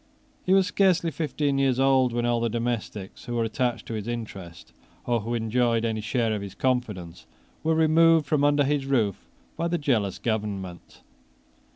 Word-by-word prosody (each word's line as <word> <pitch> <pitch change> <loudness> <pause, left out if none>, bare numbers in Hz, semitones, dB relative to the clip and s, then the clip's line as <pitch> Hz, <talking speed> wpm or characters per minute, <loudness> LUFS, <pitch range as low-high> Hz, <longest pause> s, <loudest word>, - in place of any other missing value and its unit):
He 185 - +4
was 195 -1 +4
scarcely 180 -4 +2
fifteen 145 -2 -1
years 135 -2 +2
old 135 -2 +3
when 120 0 -1
all 120 0 +1
the 115 0 0
domestics 115 -4 -4
who 120 - -4
were 115 - +1
attached 120 +2 -1
to - - -6
his 110 -1 -4
interest, 95 -9 -7 0.3
or 120 -1 +1
who 115 +3 -3
enjoyed 115 0 +1
any 110 -1 -1
share 110 +2 0
of 105 - -3
his 100 -1 -8
confidence, 105 -10 -2 0.4
were 160 0 +2
removed 160 0 +4
from 145 0 +1
under 145 0 +4
his 140 -1 0
roof 115 -8 0 0.3
by 170 - -1
the 175 0 0
jealous 115 - 0
government. 100 -5 -4
120 Hz, 175 wpm, -25 LUFS, 110-145 Hz, 0.4 s, He